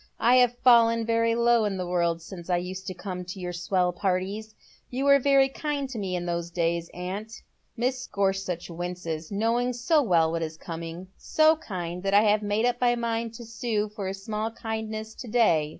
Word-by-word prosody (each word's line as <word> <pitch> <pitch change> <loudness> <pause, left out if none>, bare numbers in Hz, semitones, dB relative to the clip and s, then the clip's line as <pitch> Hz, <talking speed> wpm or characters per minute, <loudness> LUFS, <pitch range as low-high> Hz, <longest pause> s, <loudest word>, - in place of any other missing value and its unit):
I 245 +2 +5
have 245 -1 +4
fallen 230 -2 +5
very 230 0 +2
low 235 -1 +4
in 205 -2 -1
the 180 - -3
world 170 -2 0
since 175 0 -10
I 175 - +3
used 185 +2 -5
to 185 - -3
come 180 0 -5
to 180 +2 -7
your 180 -1 -4
swell 180 +1 0
parties. 195 +4 -2 0.3
You 260 +2 -2
were 280 0 +6
veiy 270 0 +4
kind 290 -2 -2
to 235 - -4
me 190 -2 -2
in 175 -1 -3
those 170 -1 -2
days, 170 -1 -1
aunt," 200 +6 -6 0.2
— - - -44
Mrs. 255 +2 -1
Gorsuch 195 -3 -1
winces, 170 -2 -5
knowing 230 +4 +1
so 265 +6 +2
well 170 - +3
what 165 0 -2
is 160 -1 -4
coming 165 +2 -7
— - - -38
" - - -40 0.2
so 315 0 +6
kind 180 - -5
that 195 +1 +1
I 205 - +7
have 210 0 +3
made 210 +2 0
up 245 0 0
my 240 -1 +4
mind 230 -1 -2
to 235 - -9
sue 225 -2 -2
for 205 -2 -5
a 190 - -3
small 215 +3 -3
kindness 220 -1 -5
to 250 - -9
day. 210 -10 +3
205 Hz, 215 wpm, -26 LUFS, 180-235 Hz, 0.3 s, I